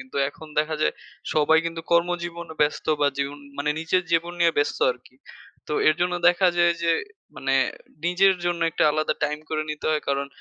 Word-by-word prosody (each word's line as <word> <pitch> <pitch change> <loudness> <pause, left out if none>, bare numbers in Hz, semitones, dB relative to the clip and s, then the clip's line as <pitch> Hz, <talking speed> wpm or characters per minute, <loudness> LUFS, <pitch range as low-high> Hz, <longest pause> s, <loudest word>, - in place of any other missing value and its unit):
কিন্তু 130 +1 -10
এখন 155 +2 -12
দেখা 155 +1 +1
যায় - - +1 0.4
সবাই 155 +1 +4
কিন্তু 165 0 -4
কর্মজীবনে 170 -1 -1
ব্যস্ত 150 - -1
বা 145 - +4
জীবন 140 +1 -2 0.2
মানে 145 +1 0
নিজের 180 +3 +1
জীবন 170 +1 +1
নিয়ে 170 -1 +4
ব্যস্ত 145 - 0
আরকি। 125 +1 -11 0.5
তো - - -3 0.2
এর 155 - +5
জন্য 180 0 +1
দেখা 180 +1 +4
যায় 175 0 +4
যে 170 0 +3 0.4
মানে - - 0 0.5
নিজের 190 +2 +4
জন্য 175 -1 -1
একটা - - +1
আলাদা 155 0 0
টাইম 150 0 -2
করে 155 -1 0
নিতে 150 - -5
হয়। 155 -1 0
কারণ 140 0 0
160 Hz, 185 wpm, -24 LUFS, 150-175 Hz, 0.5 s, এর